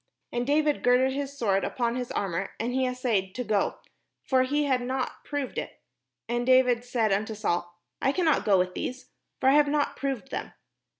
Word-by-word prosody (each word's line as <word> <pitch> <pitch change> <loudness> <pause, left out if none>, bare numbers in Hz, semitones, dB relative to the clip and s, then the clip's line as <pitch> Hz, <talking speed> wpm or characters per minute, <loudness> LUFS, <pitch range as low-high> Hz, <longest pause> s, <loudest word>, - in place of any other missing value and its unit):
And 240 +1 -2
David 300 0 +2
girded 250 +2 +3
his 280 0 -4
sword 195 -6 +1
upon 235 -1 -1
his 250 -1 -4
armour, 190 -1 -2
and 235 +2 -2
he 260 0 +1
assayed 230 -7 -1
to 250 - -2
go; 210 -4 0 0.5
for 260 -1 +3
he 290 +3 +1
had 260 -3 +1
not 255 +1 -3
proved 285 -3 -3
it. - - -7 0.5
And 240 +1 -1
David 250 -1 +4
said 235 -4 0
unto 215 +3 0
Saul, 175 -4 -2 0.2
"I 270 - +3
cannot 325 0 +2
go 200 -2 +4
with 180 0 0
these; 255 +6 -5 0.3
for 260 - +4
I - - +5
have 295 0 +5
not 290 0 0
proved 270 -1 -3
them." - - -4
250 Hz, 190 wpm, -27 LUFS, 220-270 Hz, 0.5 s, I